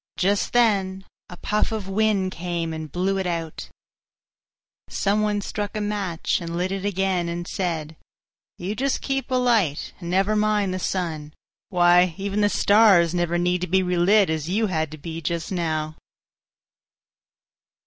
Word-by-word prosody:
Just 200 +2 +1
then 195 -5 +2 0.2
a 180 - -10
puff 210 +4 0
of 215 -3 -4
wind 195 -1 +1
came 170 -2 -3
and 160 -1 -6
blew 195 +2 0
it 190 - -2
out. 165 -2 -4 1.2
Some 205 +1 0
one 210 -1 0
struck 205 +1 -4
a - - -1
match 200 -5 -1
and 170 0 -4
lit 180 +2 -1
it 195 -1 -3
again, 190 -3 0
and 170 +1 -4
said, 160 -4 -3 0.6
"You 185 +4 -3
just 270 +4 -1
keep 270 -1 -2
alight, 235 - +1
and 170 -2 -6
never 195 +4 +2
mind 210 -2 +1
the 185 - -3
sun. 160 -5 -3 0.3
Why, 175 -1 +4
even 200 +1 -2
the 205 - +4
stars 200 -6 +5
never 175 -1 0
need 180 0 0
to 180 - -2
be 190 +2 +2
relit 180 +2 +3
as 160 0 -3
you 215 +4 +1
had 160 -6 -1
to 155 - -9
be 165 +2 -7
just 165 +2 -3
now." 155 -3 -2
185 Hz, 160 wpm, -23 LUFS, 170-205 Hz, 1.2 s, stars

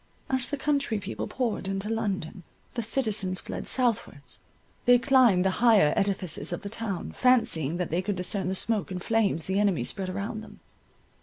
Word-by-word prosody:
As 260 -1 0
the 290 - -2
country 280 -5 0
people 200 -1 -5
poured 235 -6 -2
into 195 +1 -3
London, 200 -6 -3 0.3
the 245 - -2
citizens 215 -5 -1
fled - - -6
southwards—they 245 - -1
climbed 240 -8 +4
the 190 - +3
higher 215 -11 +5
edifices 195 -4 -1
of 175 - -4
the 200 - -5
town, 210 -5 -4
fancying 175 - +2
that 180 -3 -3
they 170 +3 +1
could 200 +1 -2
discern 185 +1 0
the 190 - -1
smoke 215 +1 0
and 180 -1 -5
flames 215 -7 +1
the 190 +1 0
enemy 200 -11 +2
spread 185 +8 -2
around 200 +4 -4
them. 220 - -13
200 Hz, 170 wpm, -27 LUFS, 185-230 Hz, 0.3 s, higher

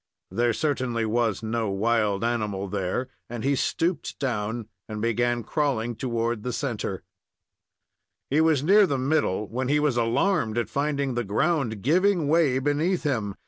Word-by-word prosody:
There 120 +1 +2
certainly 130 -5 -1
was 115 -1 0
no 110 -1 -1
wild 105 0 +1
animal 105 -4 -1
there, 100 +5 -2 0.2
and 120 -1 -5
he 140 +2 +2
stooped 165 +5 -1
down 115 -3 -2 0.2
and 110 0 -4
began 120 +1 0
crawling 120 -6 -1
toward 115 -1 -2
the 125 - -3
centre. 115 -8 -3 1.3
He 150 +3 +4
was 160 -4 +3
near 200 +4 +6
the 140 -4 0
middle 130 -7 0
when 125 +4 -3
he 145 +2 +3
was 150 -5 +1
alarmed 120 - +1
at 120 - -1
finding 140 -2 0
the 120 0 -1
ground 115 - 0
giving 175 - +3
way 150 -4 +3
beneath 150 +7 0
him. 110 -9 -1
120 Hz, 150 wpm, -26 LUFS, 110-145 Hz, 1.3 s, near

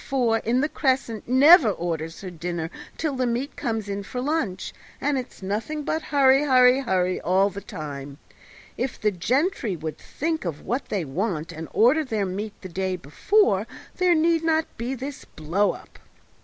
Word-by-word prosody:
4, 240 -5 +1
in 240 +4 +1
the 295 - +2
Crescent, 260 -7 -1
never 270 - +7
orders 165 -3 -3
her 185 -2 -6
dinner 170 -1 -4 0.3
till 305 -4 -1
the 255 -1 0
meat 245 +5 -2
comes 225 -7 -2
in 200 0 -3
for 250 +5 -6
lunch, 255 - -2 0.3
and 290 0 0
it's 255 -6 -6
nothing 225 +11 -3
but 315 +2 -1
hurry, 275 -2 +4
hurry, 250 -9 +3
all 190 +3 +2
the 200 - -7
time. 145 -4 -7 0.6
If 255 +1 -3
the 210 - +2
gentry 240 - 0
would 155 -2 -6
think 320 +2 -3
of 165 -5 -5
what 245 +6 -2
they 195 -6 -1
want, 165 +2 -2
and 160 -1 -7
order 260 +8 +4
their 220 -7 -1
meat 200 +3 -5
the 185 - -8
day 185 +1 -2
before, 195 - +1 0.3
there 360 -1 +4
need 330 +1 +2
not 320 -1 +2
be 245 +4 -3
this 270 +2 -7
blow 175 +7 0
up!" - - -14
225 Hz, 170 wpm, -24 LUFS, 185-275 Hz, 0.6 s, never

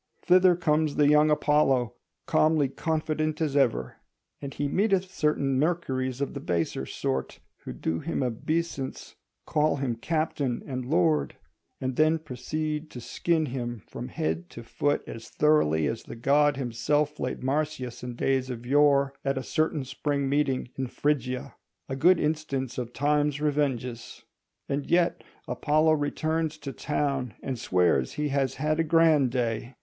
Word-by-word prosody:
Thither 180 0 +5
comes 155 -3 +1
the 145 - +4
young 150 +1 +5
Apollo, 140 -6 +2 0.3
calmly 155 -3 +3
confident 155 +1 -1
as 150 -4 -1
ever; 115 - +1 0.4
and 140 -1 -5
he 145 - -2
meeteth 190 +2 +1
certain 140 -5 +1
Mercuries 135 -5 -1
of 140 - -2
the 140 - -5
baser 85 - -2
sort, 65 0 -3 0.3
who - - -5
do 80 0 -2
him 160 -3 -2
obeisance, 135 +3 -3 0.3
call 155 0 +2
him 135 -3 -1
captain 145 -2 -1
and 130 -3 -4
lord, 80 - +2 0.4
and 130 -1 -3
then 155 +1 +4
proceed 155 +2 -4
to 125 - -8
skin 160 +7 0
him 120 - -5
from - - -7
head 80 +2 -3
to 120 - -10
foot 145 +5 -1
as 115 0 -9
thoroughly 80 - +3
as 115 - -2
the - - -9
god 140 +4 +3
himself 140 +4 0
flayed - - -4
Marsyas 135 -3 -2
in 125 -1 -6
days 130 +1 0
of 120 -1 -6
yore, 140 0 +4
at 135 -1 0
a 130 - -2
certain 155 -2 0
Spring 140 +1 -2
Meeting 135 -3 0
in 130 - -1
Phrygia: 130 -1 -1 0.3
a 135 - -3
good 170 +6 +5
instance 150 -5 -2
of 120 -1 -4
Time's 145 +1 +1
revenges. 135 -5 -2 0.4
And 140 0 -3
yet 175 0 +2 0.2
Apollo 155 +1 +2
returns 155 +1 -1
to 140 -3 -7
town 140 -4 -2
and 130 -3 -3
swears 90 - +2
he 150 0 -2
has 135 -1 0
had 155 +2 0
a - - +4
grand 160 -4 +4
day. 120 0 -2
140 Hz, 155 wpm, -27 LUFS, 125-155 Hz, 0.4 s, Thither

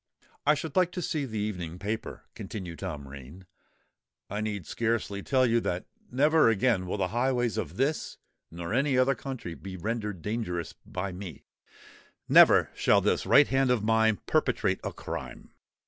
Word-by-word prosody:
"I 150 - +6
should 150 0 -6
like 180 -1 +3
to 180 - -3
see 150 -3 -1
the 110 -4 -5
evening 90 -5 -3
paper," 105 +4 -5
continued 90 -6 -7
Tom 70 -2 -5
Rain. 70 +7 -11 0.9
"I 105 +1 -2
need 105 -5 -3
scarcely 110 -1 -1
tell 130 +3 +2
you 115 -1 +3
that 90 -5 -3 0.3
never 150 +2 +4
again 110 -4 +1
will 95 - -2
the 100 - 0
highways 120 -2 0
of 85 +2 -4
this 145 +4 -1 0.3
nor 85 +2 -6
any 135 +1 +2
other 130 +2 +4
country 130 -9 -6
be 95 +2 -8
rendered 105 -3 -3
dangerous 95 -6 -3
by 95 +1 -4
me—never 90 -4 +1
shall - - +3
this - - 0
right 145 +1 +7
hand 135 -1 +2
of 125 -4 +2
mine 110 -1 +3
perpetrate - - +1
a - - -3
crime. - - -7
110 Hz, 160 wpm, -28 LUFS, 90-130 Hz, 0.9 s, right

